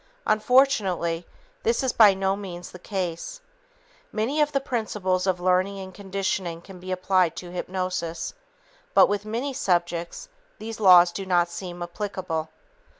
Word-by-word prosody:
Unfortunately, 210 -8 +2 0.3
this 465 - +1
is 260 - 0
by 210 -4 +7
no 190 0 0
means 180 -3 -8
the 180 - -11
case. 185 - -4 0.7
Many 250 +8 0
of 295 0 +2
the 275 - +1
principles 210 -8 -1
of 185 -1 +1
learning 185 +2 +1
and 190 -1 -8
conditioning 190 -3 -3
can 190 -1 -12
be 185 +1 -7
applied 185 -2 +2
to 175 -1 -8
hypnosis, 180 -2 -3 0.6
but - - +8
with 205 0 -2
many 240 +6 -3
subjects 175 - -1 0.3
these 225 0 -7
laws 180 -3 +7
do 195 - -5
not 175 -2 +2
seem 175 0 -6
applicable. 175 -3 -4
190 Hz, 145 wpm, -25 LUFS, 175-215 Hz, 0.7 s, but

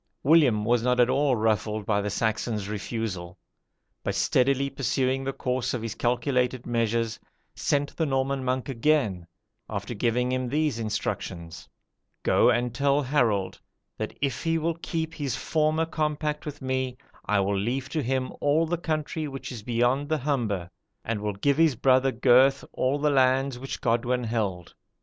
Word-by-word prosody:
William 130 -8 +4
was 120 0 +3
not 125 +1 +1
at 125 +1 +5
all 135 0 +2
ruffled 110 -1 0
by 100 -1 +1
the 105 - -2
Saxon's 110 0 -1
refusal, 100 -4 -4 0.7
but - - -2
steadily 135 +2 +2
pursuing 135 0 0
the 135 - -1
course 125 -1 -2
of 115 - -4
his 115 -2 -3
calculated 125 0 0
measures, 115 -1 0 0.3
sent 145 0 -1
the 160 - 0
Norman 135 0 0
monk 130 +1 -1
again, 120 - +1 0.4
after - - -4
giving 125 +2 0
him 130 -1 -1
these 150 -3 0
instructions: 85 -6 -4 0.5
'Go - - +4
and 120 0 +1
tell 140 +3 +2
Harold, 120 -8 0 0.4
that - - -4
if 135 -4 -1
he 165 -1 +1
will 165 +1 -1
keep 160 -2 -3
his 145 -6 -3
former 155 +1 +1
compact 150 -1 -2
with 145 -2 -7
me, 130 -1 -2 0.3
I 105 -1 +3
will 100 +1 0
leave 120 +7 -1
to 155 +2 -1
him 130 0 -1
all 150 +3 +3
the 170 +1 -2
country 155 -1 -2
which 135 -1 -7
is 120 -4 -7
beyond 120 +5 +1
the 155 - +2
Humber, 115 - -1 0.3
and 110 -2 -2
will 105 0 -2
give 140 +8 +1
his 160 -4 +4
brother 130 +2 +3
Gurth 130 +3 +4
all 130 +3 +1
the 150 0 +1
lands 130 -1 +2
which 135 +1 -6
Godwin 120 +2 +1
held. 105 -7 -2
130 Hz, 165 wpm, -26 LUFS, 115-140 Hz, 0.7 s, at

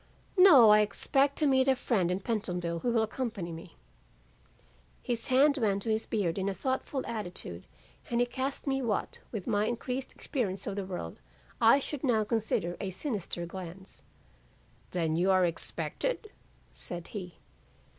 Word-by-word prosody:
'No, 305 - +9
I 210 - +7
expect 270 +6 +2
to 310 - +2
meet 265 -1 +4
a 265 - +5
friend 195 -8 +1
in 180 +2 -1
Pentonville 180 -7 -2
who 245 - -1
will 230 -1 +3
accompany 220 -6 -3
me." 165 +1 -10 1.3
"His 235 -2 -2
hand 280 +3 +4
went 200 -4 +1
to 225 - -1
his 220 +1 -1
beard 195 -4 0
in 190 +1 0
a 195 - -3
thoughtful 260 +5 -2
attitude 210 -6 -5 0.4
and 235 -1 +1
he 245 - +4
cast 260 +3 -4
me 270 -1 0
what, 225 -5 -2
with 210 -6 -4
my 210 -2 +1
increased 250 +2 -3
experience 200 -9 -3
of 200 - -3
the 200 - -2
world, 175 - -6 0.4
I 230 +3 +7
should 285 0 -5
now 230 -5 +3
consider 210 -6 -1
a 195 - -2
sinister 190 - -4
glance. 185 +1 -9 0.9
'Then 165 -3 0
you 180 +3 +2
are 185 -1 +5
expected?' 430 - -3 0.4
said 175 -1 -6
he. 180 -5 -7
215 Hz, 160 wpm, -30 LUFS, 185-255 Hz, 1.3 s, No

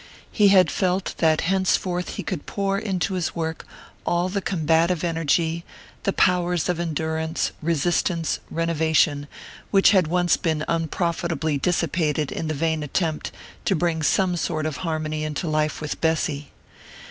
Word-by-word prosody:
He 210 -2 +4
had 190 -2 +5
felt 185 0 0
that 160 -1 +3
henceforth 185 -1 0
he - - -4
could 175 -7 -4
pour 195 -1 -1
into 195 -3 -1
his 180 -3 -2
work 160 -1 -4 0.4
all 175 +1 +1
the 200 +1 -2
combative 165 -1 +1
energy, 165 0 0 0.4
the 195 - +3
powers 180 -3 +2
of 180 -2 -1
endurance, 160 -1 -1
resistance, 165 +1 0
renovation, 160 -3 +1 0.4
which 195 0 +5
had 185 -6 +4
once 175 +1 +2
been 155 -2 -1
unprofitably 165 -2 -1
dissipated 160 -3 0
in 160 - -3
the 155 - -2
vain 160 +1 0
attempt 155 +1 -2 0.3
to 195 - +2
bring 165 -1 0
some 180 +3 +2
sort 155 -2 -2
of 155 -2 -2
harmony 155 -3 -2
into 155 +3 -3
life 155 0 0
with 150 -1 -5
Bessy. 155 -3 0
165 Hz, 145 wpm, -24 LUFS, 155-180 Hz, 0.4 s, had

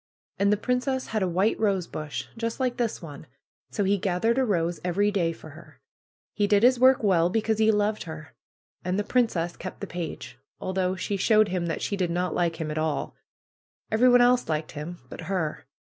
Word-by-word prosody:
"And 200 +1 +3
the 210 - +3
princess 255 +3 -1
had 215 -1 -1
a 190 - +2
white 190 +5 +1
rosebush 185 -8 -2
just 230 +1 -3
like 255 -2 0
this 230 -6 -2
one, 150 -1 -9 0.4
so 205 - -1
he 200 +1 +2
gathered 210 +6 +1
a - - +3
rose 175 -7 0
every 200 +4 +1
day 175 -5 +1
for 160 -1 -11
her. 160 +3 -15 0.5
He 205 -1 +1
did 205 +1 +3
his 250 0 +5
work 260 -1 +5
well, 175 -4 +3
because 220 +2 0
he 220 0 +4
loved 210 0 0
her. 160 -2 -9 0.5
And 180 +2 -1
the 205 - +1
princess 200 -8 0
kept - - -8
the - - -4
page, 170 -2 -6 0.2
although 185 0 -1
she 200 +2 -2
showed 215 +1 +4
him 175 -1 -1
that 165 - -3
she 200 - -1
did 185 -3 -1
not 180 +1 -1
like 170 -2 0
him 155 -2 -3
at 155 - -2
all. 155 -2 -2 0.8
Everyone 245 +2 +5
else 245 -3 +3
liked 155 0 -2
him 160 +4 -6
but - - -9
her. 180 -6 -3
195 Hz, 200 wpm, -26 LUFS, 170-220 Hz, 0.8 s, his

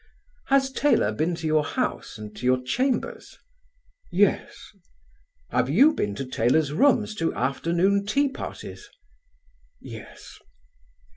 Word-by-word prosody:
"Has 270 0 +3
Taylor 265 - +2
been 160 +10 -1
to 165 -1 -7
your 155 -1 +2
house - - -3
and 105 0 -9
to 115 - -10
your 130 0 +2
chambers?" 250 - -2 0.7
"Yes." 195 +3 +1 0.9
"Have 125 +1 +1
you 270 - +5
been 100 -1 -2
to 135 - -4
Taylor's 130 +5 +1
rooms 225 - +3
to 165 - 0
afternoon 170 - +1
tea 280 +7 +2
parties?" 265 - -8 0.9
"Yes." - - -11
165 Hz, 120 wpm, -25 LUFS, -, 0.9 s, you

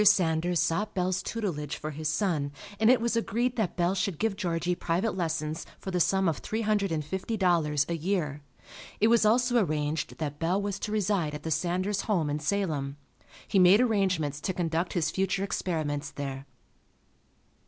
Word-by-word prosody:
Sanders 175 -3 +3
sought 205 +6 0
Bell's 185 0 0
tutelage 175 -11 -3
for 155 - -5
his 155 +1 -4
son, 155 -6 0 0.3
and 220 +1 +5
it 255 - +6
was 235 +1 0
agreed 235 +2 0
that 220 -6 -1
Bell 175 +1 +2
should 195 -3 -1
give 220 +1 0
Georgie 175 -2 -1
private 180 +5 -1
lessons 160 -3 -2
for 190 - -6
the 180 - 0
sum 190 +2 +3
of 165 - +1
three 220 +1 -3
hundred 210 -3 +1
and 155 -2 -1
fifty 190 +7 -3
dollars 160 -6 +2
a 170 - -2
year. 160 -4 -1 0.6
It 220 - +4
was 230 -2 +5
also 245 +1 +3
arranged 150 -2 -2
that 145 -2 -4
Bell 175 +4 +1
was 200 -1 -3
to 210 - -4
reside 195 -7 0
at 150 - -8
the 160 - -3
Sanders 185 +6 0
home 170 -9 0
in 150 - -1
Salem. 150 -5 -1 0.5
He 195 - +2
made 185 +3 +7
arrangements 185 - +1
to 185 - -2
conduct 170 0 -1
his 170 -4 0
future 195 0 0
experiments 155 -7 -2
there. 135 -1 -6
180 Hz, 180 wpm, -28 LUFS, 155-200 Hz, 0.6 s, made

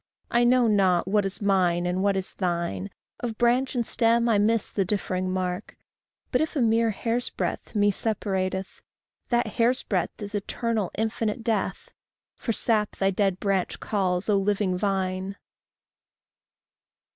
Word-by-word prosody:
I 240 +1 +4
know 245 0 +4
not 190 -5 +3
what 205 0 +2
is 195 +2 -6
mine 180 -3 +2
and 180 +1 0
what 200 0 +2
is 190 - -3
thine 170 - -2 0.3
Of 230 -3 -4
branch 245 +3 +2
and 240 -2 0
stem 235 +1 +2
I 215 -3 +4
miss 220 +1 +1
the 195 - +1
differing 185 -1 -1
mark 185 -1 -3 0.5
But - - +2
if 315 +1 -2
a - - +1
mere 230 0 +3
hair's 230 +3 -1
breadth - - -4
me 205 0 +4
separateth, 190 -3 -2 0.5
That 240 -1 +2
hair's 245 +2 +1
breadth 185 -4 -2
is 205 0 -7
eternal, 215 0 -1
infinite 220 +1 -1
death. 225 -2 -2 0.4
For 230 - -3
sap 215 -2 +1
thy 195 0 +1
dead 195 -1 0
branch 195 -2 -1
calls, 185 -3 -1
O 205 -2 +3
living 195 -1 +1
vine! 190 0 -1
205 Hz, 150 wpm, -26 LUFS, 185-230 Hz, 0.5 s, I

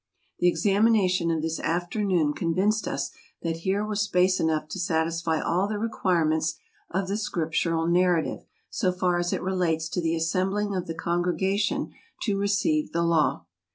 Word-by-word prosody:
The 175 - +3
examination 190 0 +3
of 160 -2 0
this 160 0 -2
afternoon 175 -2 0
convinced 190 +8 0
us 140 0 -2 0.3
that 165 -1 -1
here 195 +5 -1
was 210 -1 -1
space 185 -2 +2
enough 155 -1 0
to 190 - -5
satisfy 165 -1 0
all 180 +4 +1
the 215 - -3
requi¬ 190 -6 0
sitions 160 +1 0 0.3
of 190 +1 -1
the 200 +2 -1
Scriptural 165 -4 -1
narrative, 175 -1 +2 0.3
so 185 -5 +1
far 180 -1 0
as 175 0 -1
it - - -2
relates 175 -4 0
to 180 - -2
the 165 0 0
assembling 190 +5 0
of 185 -2 -3
the 165 - -4
congregation 180 +4 0 0.3
to 205 -4 0
receive 200 +11 +1
the 170 0 +1
Law. 165 -3 +2
180 Hz, 160 wpm, -26 LUFS, 165-195 Hz, 0.3 s, The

